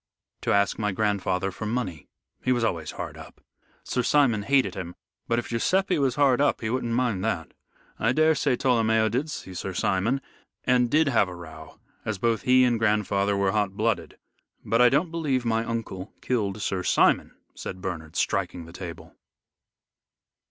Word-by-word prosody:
"To - - 0
ask 100 +2 +2
my 105 -1 0
grandfather 95 -2 0
for 105 +3 -6
money. 105 - -3 0.4
He 130 - +1
was 120 -2 +1
always 85 -8 -1
hard - - -6
up. - - -12 0.4
Sir 125 - -1
Simon 125 -4 +3
hated 135 +5 +2
him, 90 -2 -6 0.3
but 115 - +1
if 120 - -3
Guiseppe 185 - +1
was 135 -3 +1
hard 140 -2 +3
up 145 - +2
he 110 -1 -2
wouldn't 120 -2 -1
mind 120 -7 0
that. 95 -7 -2 0.5
I 115 - +2
daresay 155 -2 +3
Tolomeo 110 -3 +2
did 130 +8 -1
see 95 -9 -7
Sir 95 +1 -5
Simon, 100 +9 +1 0.4
and 125 -1 +3
did 155 +4 +3
have 110 -7 +3
a 90 - -8
row, 80 -2 -11 0.2
as 110 -2 -2
both 115 +1 +1
he 130 0 +5
and 120 -2 +2
grandfather 105 -2 +1
were 100 -1 +2
hot 100 -1 0
blooded. 115 +1 -1 0.5
But - - +2
I 125 - +7
don't 150 +6 +1
believe 145 -7 -1
my 115 -1 +1
uncle 110 -4 -5
killed 105 -5 -1
Sir 95 -2 -1
Simon," - - +2 0.2
said 95 - -7
Bernard, 80 -4 -6
striking 85 -2 -1
the 85 - -13
table. 90 -2 -8
110 Hz, 175 wpm, -26 LUFS, 95-125 Hz, 0.5 s, I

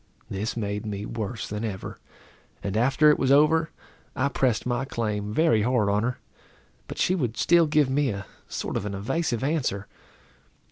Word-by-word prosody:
This 105 +5 -3
made 105 -2 -2
me 105 -1 -4
worse 110 -1 -4
than 105 +1 -4
ever; 100 -4 -5 0.6
and 100 0 -3
after 135 +6 +5
it - - +1
was 135 0 +2
over, 155 +3 +4 0.5
I 140 +2 +1
pressed 125 -4 0
my 125 +1 0
claim 105 -5 -2
very 115 -3 +3
hard 115 -2 +2
on 100 +1 +2
her, 125 +2 -1 0.7
but - - -7
she 185 - +2
would 125 - -1
still 165 +10 +4
give 150 -2 +3
me 135 +1 +1
a 100 -1 -4 0.2
sort - - -3
of 105 - -3
an 100 - -4
evasive 120 +4 -1
answer. 135 -10 -1
120 Hz, 175 wpm, -26 LUFS, 105-140 Hz, 0.7 s, after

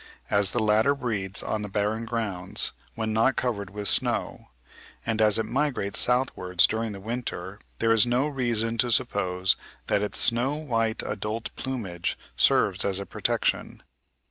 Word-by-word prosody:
As 100 -2 +4
the 120 +4 0
latter 110 +6 +3
breeds 105 -8 -2
on 110 - -2
the 105 - -5
"barren 105 +3 -1
grounds," 110 -6 -2 0.2
when 110 -1 -2
not 115 +4 +3
covered 105 -6 -2
with 105 0 -2
snow, - - 0 0.6
and 110 0 0
as 105 0 +6
it 110 - 0
migrates 130 -7 0
southward 125 -8 +2
during 110 -1 -2
the 100 - -8
winter, 105 -3 -5 0.2
there 115 0 +2
is 115 +1 +4
no 125 +4 +1
reason 115 -5 -1
to 125 - +2
suppose 95 -6 +1 0.3
that 100 - +1
its 105 - 0
snow 125 +4 +2
white 115 -7 -1
adult 110 +2 -4
plumage 100 -10 -4 0.2
serves - - +3
as 95 -1 0
a 100 - -5
protection. - - -1
110 Hz, 155 wpm, -26 LUFS, 100-120 Hz, 0.6 s, as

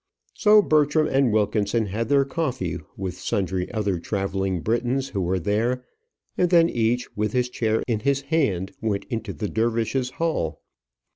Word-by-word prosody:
So 210 -1 +5
Bertram 155 -1 +3
and 135 -4 +2
Wilkinson 105 +1 +1
had 110 +5 -3
their 140 -1 +4
coffee 130 - -2 0.2
with 95 -2 -5
sundry 95 -1 -2
other 100 -5 -1
travelling 95 -1 -2
Britons 120 +5 0
who 100 - -2
were 90 +1 0
there; 115 +8 0 0.5
and 180 - +2
then 170 -1 +5
each, 120 +1 -1
with 105 0 -1
his 125 -1 +1
chair 110 -2 0
in 115 -4 0
his 140 +4 +1
hand 135 - 0
went 105 -3 -1
into 115 -3 -3
the 105 +1 -4
dervishes' 115 +4 0
hall. 160 - -1
115 Hz, 155 wpm, -24 LUFS, 100-135 Hz, 0.5 s, So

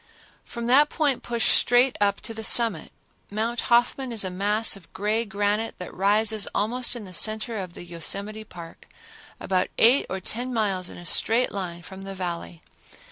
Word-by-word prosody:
From 235 0 -7
that 280 +5 +5
point 290 -5 0
push 235 -1 0
straight 245 +2 +4
up 200 -1 +1
to 225 - -7
the 220 0 -7
summit. 225 -8 +3 0.4
Mount 225 +3 -2
Hoffman 245 +2 +2
is 225 -3 0
a 185 - -3
mass 205 +4 +2
of 195 -4 -16
gray 215 +3 -1
granite 205 +2 -2
that 180 - -8
rises 210 +2 +2
almost 245 +4 -1
in 230 -4 -7
the 185 - -11
center 220 +4 +1
of 180 -3 -7
the - - -9
Yosemite 200 +5 -2
Park, 170 -5 -12 0.5
about 185 -1 0
eight 245 +5 +5
or 190 - -3
ten 245 +7 -3
miles 195 -6 -1
in - - -10
a 175 - -11
straight 230 +8 +3
line 175 -3 -6
from 190 +1 -11
the 195 0 -7
Valley. 175 -2 -6
210 Hz, 180 wpm, -24 LUFS, 190-235 Hz, 0.5 s, that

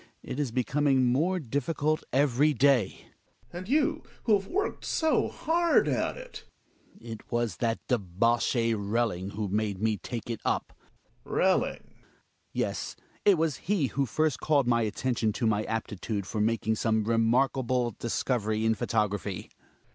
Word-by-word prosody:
It 130 - -5
is 145 -3 0
becoming 135 +1 +2
more 160 +10 +2
diffi 140 +2 -2
^ - - -21
cult 155 +2 +1
every 140 +2 +3
day 130 -5 +2 0.5
Gregers. - - -30
And 180 +3 -7
you, 295 +3 +2 0.2
who 220 - +3
have 195 -1 +2
worked 405 +3 -2
so 320 -1 +1
hard 340 +1 +2
at - - 0
it - - -10 0.6
Hjalmar. 115 - -9
It 110 - -9
was 120 -2 -1
that 115 -1 0
debauchee 115 +2 +1
Relling, 100 -2 -1
who 105 0 -2
made 105 -1 -1
me 110 0 +1
take 115 +3 -6
it 115 -2 -4
up. - - -1 0.5
Gregers. - - -13
Relling? - - +2
Hjalmar. - - -28 0.6
Yes, - - -2 0.3
it 200 -3 +6
wag 160 -1 +1
he 195 -6 0
who 140 -1 +1
first 150 +3 0
called 145 -4 +2
my 120 -1 +3
atten 125 +4 -1
tion 110 -2 0
to 120 - -2
my 110 -1 +1
aptitude 105 -2 -3
for 105 +2 -2
making 110 0 +1
some 110 0 +1
remarkable 120 +2 +2
dis 115 +2 -3
covery 110 -3 0
in 110 - +4
photography. 105 -3 -2
120 Hz, 165 wpm, -28 LUFS, 110-145 Hz, 0.6 s, it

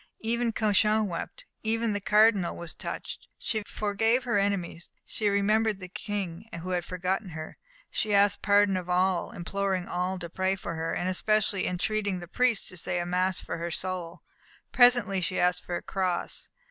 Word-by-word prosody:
Even 235 +1 0
Cauchon 215 0 +3
wept. 170 -3 -6 0.2
Even 225 0 0
the 205 - -2
Cardinal 210 -3 +4
was 170 -1 -7
touched. - - -6
She 220 -3 -2
forgave 225 +4 +1
her 235 -5 +1
enemies; 190 -4 -2 0.2
she 210 -2 -1
remembered 210 +1 +2
the 185 -1 -9
King, 200 0 -5
who 185 - -4
had 175 -1 0
forgotten 185 +3 -2
her; 160 -2 -8 0.3
she 215 - -1
asked 200 0 +4
pardon 205 -1 +4
of 180 -1 -5
all, 180 0 +2
imploring 190 +1 -2
all 180 +1 -1
to 175 -1 -5
pray 190 +3 0
for 175 -3 -5
her, 165 0 -2
and 180 - -1
especially 205 +1 +1
entreating 200 +2 -1
the 175 - -9
priests 245 +3 +1
to 185 - -11
say 175 - -2
a 175 - -2
mass 185 +1 +1
for - - -5
her 170 +1 -3
soul. 175 -1 -4 0.5
Presently 240 -6 +5
she 185 - -1
asked 180 0 +2
for 175 - -3
a - - -4
cross. 185 -3 -2
195 Hz, 175 wpm, -28 LUFS, 180-215 Hz, 0.5 s, Presently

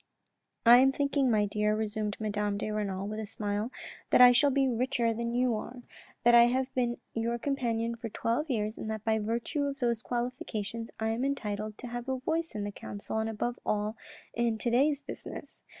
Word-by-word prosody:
" - - -52
I 235 +1 +10
am 265 +2 +6
thinking, 280 -1 +1
my 215 -3 +3
dear," 210 +1 +1
resumed 215 -1 -2
Madame 210 -1 -1
de 215 - -3
Renal 200 -2 -2
with 215 +1 -4
a 215 - -4
smile, 210 +1 -2 0.2
" - - -18
that - - +5
I 250 0 +10
shall 285 +4 +4
be 270 0 +2
richer 240 -1 +1
than 235 +1 -3
you 250 -1 +2
are, 240 +3 -6 0.4
that 240 - +6
I 235 0 +9
have 260 +2 0
been 245 -2 0 0.2
your 230 +1 -1
companion 235 -3 -1
for 230 0 -6
twelve 235 +9 -1
years, 215 -3 -1
and 220 - -4
that 220 0 -4
by 220 -1 +2
virtue 235 +7 -1
of 280 -1 -3
those 235 -4 0
qualifications 235 -2 -3
I 220 0 0
am 225 +3 -1
entitled 215 -6 -2
to 250 - -7
have 240 +2 -5
a 260 - 0
voice 320 +2 -2
in 210 - -2
the 205 - -3
council 205 +2 -5
and, 220 0 -1
above 240 +3 -3
all, 210 +1 -1 0.4
in 235 -1 0
today's 270 +6 +2
business. - - -8
230 Hz, 205 wpm, -30 LUFS, 215-250 Hz, 0.4 s, I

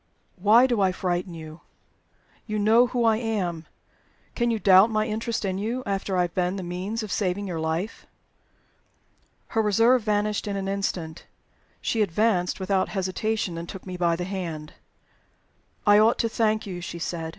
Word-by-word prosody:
"Why 215 +7 +6
do 240 -5 +1
I 190 -1 +3
frighten 180 -1 -2
you? 160 0 -10 0.9
You 215 -1 -2
know 225 +4 +5
who 245 -1 -1
I 220 -1 +4
am. 190 -8 -2 0.7
Can 240 -1 0
you 230 - +1
doubt 195 +1 +6
my 215 -1 0
interest 225 0 -2
in 190 0 -2
you, 235 +5 -2
after 195 -2 -2
I 180 - +3
have 175 - -4
been 180 0 0
the 190 - -5
means 185 +6 -4
of 210 - -6
saving 200 0 -1
your 175 -4 -4
life?" 160 +7 -3 1.4
Her 225 - +1
reserve 230 +4 +4
vanished 210 0 0
in 200 - -2
an 195 -1 -3
instant. 185 -5 -3 0.5
She 225 - 0
advanced 200 -1 +1
without 190 0 0
hesitation, 190 -1 -2
and 170 - -8
took 190 - -8
me 185 -1 -6
by 170 -1 +1
the 175 - -4
hand. 170 -5 -5 1.1
"I 205 0 +6
ought 220 +2 +4
to 230 - 0
thank 220 -1 0
you," 180 -3 -6
she 170 - -6
said. 165 -1 -4
195 Hz, 175 wpm, -25 LUFS, 180-220 Hz, 1.4 s, Why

